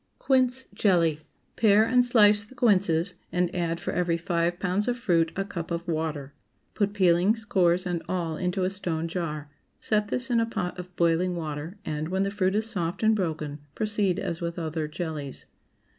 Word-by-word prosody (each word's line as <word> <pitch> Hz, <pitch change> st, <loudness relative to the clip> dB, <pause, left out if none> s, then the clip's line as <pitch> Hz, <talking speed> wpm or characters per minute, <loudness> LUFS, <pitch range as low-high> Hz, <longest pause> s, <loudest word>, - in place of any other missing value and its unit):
QUINCE 260 Hz, -1 st, +2 dB
JELLY. 175 Hz, -7 st, +3 dB
✠ -, -, -22 dB, 0.4 s
Pare 215 Hz, -1 st, +5 dB
and 250 Hz, +2 st, +4 dB
slice 210 Hz, -4 st, +5 dB
the 215 Hz, +6 st, -16 dB
quinces, 190 Hz, -7 st, +2 dB, 0.2 s
and 180 Hz, 0 st, 0 dB
add 170 Hz, -1 st, -1 dB
for -, -, -3 dB
every 175 Hz, -2 st, 0 dB
five 170 Hz, 0 st, 0 dB
pounds 190 Hz, +3 st, 0 dB
of 245 Hz, 0 st, 0 dB
fruit 170 Hz, -9 st, +2 dB
a 195 Hz, -, -1 dB
cup 170 Hz, -4 st, -6 dB
of 170 Hz, +1 st, -3 dB
water. 155 Hz, -4 st, -3 dB, 0.4 s
Put 205 Hz, -1 st, 0 dB
peelings, 195 Hz, +3 st, +3 dB
cores, 180 Hz, -2 st, +2 dB
and 175 Hz, -2 st, -2 dB
all 170 Hz, -3 st, -1 dB
into 180 Hz, +2 st, -1 dB
a 185 Hz, -, +1 dB
stone 165 Hz, -4 st, -2 dB
jar; 155 Hz, -4 st, -4 dB, 0.3 s
set 210 Hz, -1 st, +1 dB
this 250 Hz, +3 st, -1 dB
in 235 Hz, -, +3 dB
a 230 Hz, -, +1 dB
pot 180 Hz, -5 st, -3 dB
of 180 Hz, 0 st, -9 dB
boiling 170 Hz, +2 st, +2 dB
water, 160 Hz, +3 st, -5 dB
and, 155 Hz, 0 st, -3 dB
when 190 Hz, +2 st, 0 dB
the 195 Hz, -, -1 dB
fruit 195 Hz, -1 st, 0 dB
is 215 Hz, +1 st, +1 dB
soft 185 Hz, -3 st, -3 dB
and 220 Hz, 0 st, +4 dB
broken, 155 Hz, -6 st, -3 dB, 0.2 s
proceed 205 Hz, -4 st, 0 dB
as 170 Hz, 0 st, -3 dB
with 170 Hz, 0 st, -3 dB
other 160 Hz, -2 st, -2 dB
jellies. 155 Hz, -3 st, -5 dB
180 Hz, 190 wpm, -27 LUFS, 165-205 Hz, 0.4 s, Pare